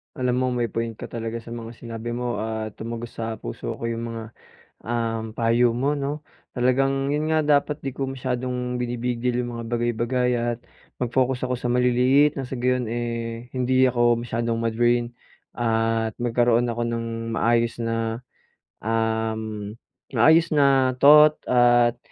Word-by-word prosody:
Alam 125 -3 0
mo 130 - +1
may 120 -1 -1
point 115 +1 -3
ka - - -9
talaga 115 0 -4
sa 115 - -13
mga 115 0 -7
sinabi 115 0 -6
mo 120 0 -2
at 110 -1 -4
tumagos 115 +1 -6
sa 115 0 -3
puso - - -6
ko - - -10
yung 115 0 -3
mga, 115 -1 -5 0.6
um, 115 -1 -2
payo 115 +1 +2
mo, 135 +5 0
'no? 145 +2 -3 0.3
Talagang 135 +2 +1
yun 150 +2 0
nga, 155 - +3
dapat 150 0 +1
'di 135 -1 -5
ko 135 - -1
masyadong 125 -1 -3
binibig-deal 125 0 -1
yung 120 -1 -4
mga 115 - -5
bagay-bagay 120 +1 0
at 120 0 -1 0.4
mag-focus 125 +1 0
ako 125 - -1
sa 120 0 -2
maliliit, 125 +4 +3
nang 135 - -3
sa 125 0 -6
gayun, 125 0 +1
eh, 115 0 -4
hindi 130 +1 +3
ako 120 -1 +2
masyadong 115 -1 -2
ma-drain 120 +1 +1 0.4
at 115 -1 0
magkaroon 120 0 +2
ako 120 0 -2
ng 115 0 -2 0.3
maayos 115 +1 +1
na, 115 0 -2 0.6
um, 110 -1 -2 0.4
maayos 160 +8 +5
na 135 -3 +4
thought 150 +1 +8 0.2
at 120 -1 +4
120 Hz, 150 wpm, -24 LUFS, 115-125 Hz, 0.6 s, thought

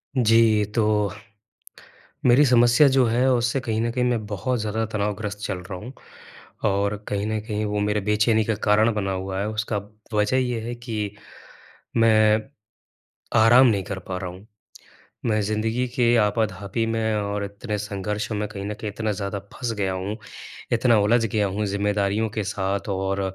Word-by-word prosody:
जी, 115 -3 +4
तो 105 -1 +1 1.1
मेरी 125 +4 +6
समस्या 120 +2 +5
जो 130 -1 +4
है, 120 +3 +2
उससे 120 +2 +1
कहीं 110 -3 -1
न 115 - 0
कहीं 125 +1 0
मैं 120 -3 0
बहुत 110 +5 -2
ज़्यादा 110 +1 -1
तनावग्रस्त 105 0 -2
चल 95 - -2
रहा 90 +1 -7
हूँ 120 +6 -9 0.8
और 100 +1 0
कहीं 100 0 -1
न 110 0 -1
कहीं 105 -1 -3
वो 105 0 -1
मेरे 105 0 0
बेचैनी 105 +2 +2
का 110 - 0
कारण 110 +2 +4
बना 100 -2 -2
हुआ 95 0 -3
है। 100 - -1
उसका 110 0 -2 0.4
वजह 105 +4 +2
ये 125 -2 0
है 120 +2 -5
कि, 110 -4 -4 0.8
मैं 110 -1 +4 1.0
आराम 120 +4 +7
नहीं 100 -5 +1
कर 95 0 -5
पा 90 0 -5
रहा 90 -1 -4
हूँ। 95 +4 -14 0.8
मैं 110 -2 +2
ज़िंदगी 110 +4 -1
के 120 -2 +3
आपाधापी 105 -1 0
में 110 -1 0
और 100 -1 -2
इतने 105 +2 -5
संघर्षों 105 +1 -3
में 105 0 -2
कहीं 100 -2 -6
न 105 - -3
कहीं 105 0 -5
इतना 110 +1 -2
ज़्यादा 100 0 -3
फँस 120 -2 -3
गया 95 -2 0
हूँ, 95 +3 -4 0.6
इतना 120 -1 +4
उलझ 115 +3 +3
गया 105 -1 0
हूँ 100 +2 -2
ज़िम्मेदारियों 100 +2 0
के 110 0 -3
साथ 100 +1 -2
और 95 0 -1
105 Hz, 170 wpm, -24 LUFS, 100-115 Hz, 1.1 s, आराम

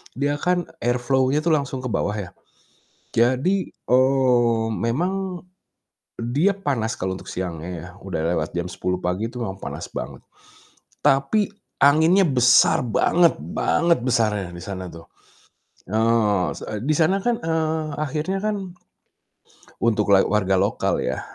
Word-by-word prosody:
dia 145 +2 0
kan 180 0 +1 0.2
air 120 +1 +2
flow-nya 130 +3 +1
tuh 170 - +3
langsung 140 -3 -3
ke 125 - -3
bawah 105 +1 -1
ya. 100 -4 -5 0.9
Jadi, 130 +12 +2
eee, 125 -3 +2 0.2
memang 180 +8 -2 0.8
dia 140 +12 +1
panas 130 - -2
kalau 95 0 -3
untuk - - -13
siangnya 85 -2 -5
ya. 85 - -9 0.2
Udah 85 -5 -3
lewat - - -2
jam 85 - -1
10.00 90 0 -2
pagi 95 +6 -1
itu 125 - -13
memang 95 -3 -5
panas - - -6
banget. - - -6 0.8
Tapi 140 +10 +2 0.3
anginnya 160 +7 +5
besar 125 -4 +5
banget 170 +9 +3 0.2
banget 170 -1 +2
besarnya 105 -6 +1
di 85 - -9
sana 95 -2 -6
tuh. 85 0 -12 0.8
Eee, 110 -3 +2
se - - -9
e - - -3
di 150 +3 +1
sana 175 +5 +2
kan, 240 -1 +2
eee, 160 -1 0
akhirnya 155 +6 -2
kan 215 - 0 1.3
untuk 110 -3 +2
lal 95 - +5
warga 95 -2 +1
lokal 100 +2 +1
ya, - - -2
125 Hz, 140 wpm, -22 LUFS, 105-160 Hz, 1.3 s, anginnya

